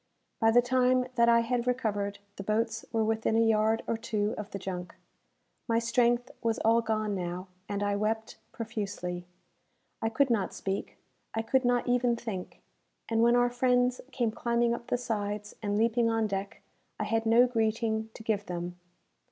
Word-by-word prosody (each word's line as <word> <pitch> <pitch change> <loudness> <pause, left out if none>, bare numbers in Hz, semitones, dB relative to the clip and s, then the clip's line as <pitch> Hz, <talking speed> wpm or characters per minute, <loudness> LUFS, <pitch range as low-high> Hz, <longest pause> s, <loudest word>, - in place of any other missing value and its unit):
By 225 - +4
the 240 +2 +5
time 255 0 +3
that 235 -1 +4
I 235 0 +6
had 240 +1 -1
recovered, 205 -5 -1 0.2
the - - -4
boats 225 +2 -1
were 225 -1 +1
within 220 0 +1
a - - +4
yard 220 0 +2
or 230 - -1
two 215 -1 -1
of 210 0 -6
the - - -5
junk. 180 -2 -6 0.7
My 230 -1 +2
strength 240 +1 +2
was 225 -2 0
all 230 +1 +5
gone 215 -2 -1
now, 180 0 -4 0.2
and 205 0 -1
I 205 0 +1
wept 220 +2 -2
profusely. 200 -6 -4 0.7
I 225 - +1
could 255 +3 +2
not 210 -5 0
speak 195 0 -4 0.4
I 225 - 0
could 260 +3 +2
not 245 0 +2
even 245 -1 +2
think; 215 -6 -6 0.5
and 225 0 +2
when 235 +1 +5
our 245 0 +3
friends 250 0 +2
came 240 -4 0
climbing 235 +1 +1
up 235 0 -6
the 245 - +1
sides, 210 -3 -3
and 205 -1 -1
leaping 230 +1 +3
on 225 -1 +1
deck, 195 -1 -4 0.4
I - - 0
had 225 0 0
no 235 +2 +6
greeting 220 -2 0
to - - -10
give 210 -2 -1
them. 175 0 -5
225 Hz, 175 wpm, -29 LUFS, 205-235 Hz, 0.7 s, I